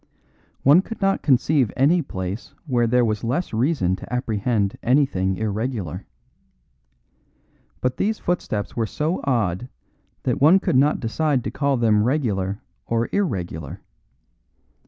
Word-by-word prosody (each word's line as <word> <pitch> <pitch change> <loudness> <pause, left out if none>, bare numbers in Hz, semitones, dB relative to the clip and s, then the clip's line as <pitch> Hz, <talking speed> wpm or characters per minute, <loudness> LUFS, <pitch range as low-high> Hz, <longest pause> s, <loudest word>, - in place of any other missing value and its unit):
One 145 +7 +7
could 225 +3 -8
not 195 0 +1
conceive 135 -2 +2
any 160 +7 +4
place 95 - -6
where 120 -5 +1
there 125 +1 +3
was 110 -2 -2
less 130 +9 -2
reason 110 - +1
to - - -11
apprehend 110 -4 0
anything 115 -8 +1
irregular. 110 - -3 1.7
But 125 0 -1
these 215 +2 0
footsteps 110 -12 -2
were 115 -2 0
so 155 - -2
odd 115 -4 0 0.5
that - - -1
one 165 +7 +7
could - - -1
not 145 +3 +3
decide 135 +2 0
to - - -3
call 140 -1 0
them 110 -3 +3
regular 105 -7 -1 0.2
or 115 0 0
irregular. 90 - -3
125 Hz, 130 wpm, -22 LUFS, 105-145 Hz, 1.7 s, One